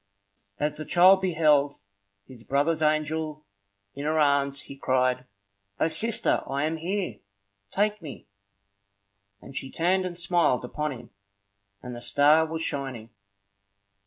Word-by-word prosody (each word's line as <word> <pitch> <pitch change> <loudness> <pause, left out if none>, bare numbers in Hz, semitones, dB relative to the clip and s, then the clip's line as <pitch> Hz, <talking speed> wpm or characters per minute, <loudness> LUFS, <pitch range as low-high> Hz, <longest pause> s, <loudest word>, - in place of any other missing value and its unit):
As 150 0 -1
the 155 - -5
child 185 +2 +6
beheld 150 -5 +2 0.5
his 125 -4 -14
brother's 150 +5 0
angel 155 0 -1 0.5
in 140 +1 -6
her 155 +1 0
arms, 140 -2 +2
he 140 - -10
cried, 130 -1 0 0.5
"O - - +3
sister, 215 +8 +1
I 140 +1 -2
am 160 +1 -1
here! 185 +4 -3 0.5
Take 210 - 0
me!" 150 -5 -9 1.2
And 135 - -12
she 135 - -4
turned 185 +5 +1
and 175 -1 -5
smiled 170 -8 +1
upon 150 +4 -3
him, 125 - -10 0.7
and 125 -1 -7
the 120 - -9
star 150 +5 +4
was 160 0 -4
shining. 130 -7 -4
150 Hz, 130 wpm, -26 LUFS, 140-165 Hz, 1.2 s, child